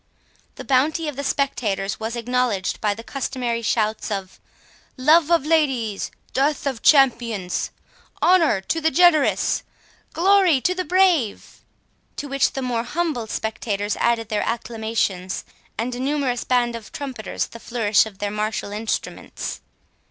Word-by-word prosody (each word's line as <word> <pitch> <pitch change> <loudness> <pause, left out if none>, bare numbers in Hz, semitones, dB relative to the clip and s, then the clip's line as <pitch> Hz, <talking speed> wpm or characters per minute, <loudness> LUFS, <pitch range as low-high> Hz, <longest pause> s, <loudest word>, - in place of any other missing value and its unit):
The - - -8
bounty 300 +5 +1
of 295 - -4
the 280 - -4
spectators 210 -9 -1
was 225 +1 -3
acknowledged 240 -4 -1
by 210 -2 +1
the 230 - -9
customary 250 -3 -3
shouts 220 -1 0
of 195 -3 -5 0.6
"Love 310 +4 +5
of 335 -5 +3
Ladies—Death 275 -1 0
of 265 -5 -2
Champions—Honour 245 - +2
to 325 +12 -2
the 320 - +3
Generous—Glory 350 +1 +2
to 365 - +1
the 365 0 -2
Brave!" 350 - +1 0.5
To 290 - -5
which 275 -1 +1
the 270 - -3
more 240 -2 -1
humble 300 -6 -2
spectators 210 -2 -2
added 230 -2 +1
their 210 - 0
acclamations, 220 -5 -2 0.3
and 240 +3 -2
a 245 - -5
numerous 265 -2 -1
band 240 -2 +1
of 230 -2 -9
trumpeters 260 -6 -4
the 230 - -12
flourish 225 -3 +2
of 205 -3 -12
their 205 0 -3
martial 210 0 -2
instruments. 215 +2 -4
245 Hz, 130 wpm, -22 LUFS, 220-290 Hz, 0.6 s, Love